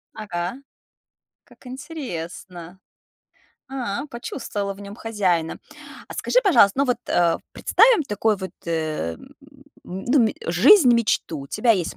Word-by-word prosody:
Ага, 180 Hz, -3 st, -4 dB, 0.9 s
как -, -, -20 dB
интересно. 185 Hz, -, -7 dB, 0.9 s
А, 260 Hz, 0 st, -4 dB
почувствовала 230 Hz, -5 st, -5 dB
в 195 Hz, -, -14 dB
нём 200 Hz, +1 st, -9 dB
хозяина. 185 Hz, -8 st, -1 dB, 0.5 s
А -, -, -8 dB
скажи, -, -, +2 dB
пожалуйста, 270 Hz, -, +5 dB
ну 280 Hz, -, +4 dB
вот, 250 Hz, -2 st, 0 dB
э, 170 Hz, -1 st, +2 dB, 0.2 s
представим 455 Hz, -5 st, +4 dB
такой 215 Hz, -4 st, 0 dB
вот, 190 Hz, -2 st, -6 dB, 0.2 s
э, 155 Hz, -, -2 dB
м -, -, -15 dB, 0.6 s
ну, 235 Hz, +8 st, +1 dB
м -, -, -3 dB
жизнь-мечту: 235 Hz, -, +4 dB
у -, -, -10 dB
тебя 235 Hz, -, +1 dB
есть 185 Hz, -6 st, +1 dB
205 Hz, 125 wpm, -23 LUFS, 175-250 Hz, 0.9 s, пожалуйста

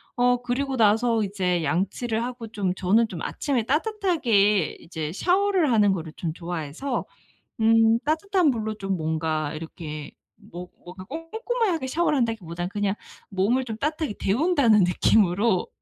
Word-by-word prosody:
어 245 Hz, 0 st, +2 dB
그리고 260 Hz, +2 st, -2 dB
나서 225 Hz, +1 st, +3 dB
이제 180 Hz, -4 st, -1 dB
양치를 220 Hz, -, -1 dB
하고 240 Hz, -2 st, -6 dB
좀 200 Hz, -4 st, -2 dB
저는 215 Hz, +5 st, +2 dB
좀 170 Hz, -4 st, -7 dB
아침에 260 Hz, -6 st, -1 dB
따뜻하게 275 Hz, -, +1 dB
이제 160 Hz, -2 st, -5 dB
샤워를 365 Hz, -, +2 dB
하는 205 Hz, -3 st, +4 dB
거를 160 Hz, -4 st, -4 dB
좀 165 Hz, -, -3 dB
좋아해서 175 Hz, -, -4 dB, 0.6 s
음 225 Hz, 0 st, +5 dB
따뜻한 335 Hz, +2 st, +1 dB
물로 220 Hz, -3 st, -3 dB
좀 195 Hz, -3 st, -3 dB
뭔가 155 Hz, -1 st, -2 dB
이렇게 155 Hz, -2 st, -7 dB, 0.3 s
뭐 175 Hz, +1 st, -10 dB, 0.2 s
뭔가 185 Hz, +1 st, -10 dB
꼼꼼하게 335 Hz, -, -2 dB
샤워를 300 Hz, +1 st, +1 dB
한다기보다는 180 Hz, -7 st, -2 dB
그냥 205 Hz, 0 st, -1 dB, 0.4 s
몸을 220 Hz, +7 st, +1 dB
좀 220 Hz, -3 st, -6 dB
따뜻하게 300 Hz, -3 st, -2 dB
데운다는 245 Hz, -, +3 dB
느낌으로 185 Hz, +2 st, +2 dB
220 Hz, 315 characters per minute, -25 LUFS, 180-265 Hz, 0.6 s, 음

